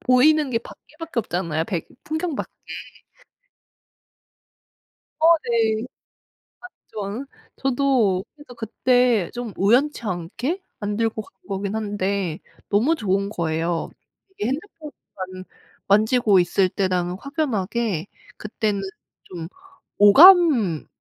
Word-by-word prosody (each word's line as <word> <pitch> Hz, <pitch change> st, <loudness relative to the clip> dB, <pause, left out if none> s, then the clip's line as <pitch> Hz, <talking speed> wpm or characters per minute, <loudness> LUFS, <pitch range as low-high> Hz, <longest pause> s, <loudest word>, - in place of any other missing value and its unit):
보이는 285 Hz, +3 st, +4 dB
게 230 Hz, -, +1 dB
밖에 265 Hz, +5 st, -16 dB
밖에 330 Hz, -5 st, -5 dB
없잖아요. 170 Hz, -6 st, -2 dB
백 170 Hz, -3 st, -4 dB, 0.2 s
풍경 315 Hz, +1 st, -2 dB
밖에. -, -, -5 dB, 2.7 s
어 320 Hz, -, +4 dB, 0.2 s
네. 225 Hz, -2 st, +1 dB, 1.1 s
맞죠. 210 Hz, +5 st, -4 dB, 0.3 s
저도 250 Hz, -8 st, +1 dB
해서 295 Hz, -4 st, -13 dB
그때 235 Hz, -2 st, +1 dB
좀 240 Hz, -3 st, -5 dB
우연치 245 Hz, +8 st, +2 dB
않게 225 Hz, -, -3 dB, 0.2 s
안 205 Hz, -1 st, -3 dB
들고 225 Hz, -1 st, -1 dB
간 -, -, -17 dB, 0.2 s
거긴 200 Hz, +1 st, -3 dB
한데 200 Hz, -5 st, -2 dB, 0.3 s
너무 235 Hz, +11 st, +3 dB
좋은 200 Hz, -, -1 dB
거예요. 165 Hz, -2 st, -2 dB, 0.4 s
이게 225 Hz, -, -4 dB
핸드폰만 265 Hz, -, -7 dB, 0.4 s
만지고 215 Hz, 0 st, +4 dB
있을 180 Hz, +2 st, +2 dB
때랑은 180 Hz, -2 st, -1 dB
확연하게. 230 Hz, -, -2 dB, 0.3 s
그때는 210 Hz, -1 st, -2 dB, 0.4 s
좀 170 Hz, -3 st, -8 dB, 0.5 s
오감을 245 Hz, -, +7 dB
215 Hz, 210 characters per minute, -22 LUFS, 190-255 Hz, 2.7 s, 오감을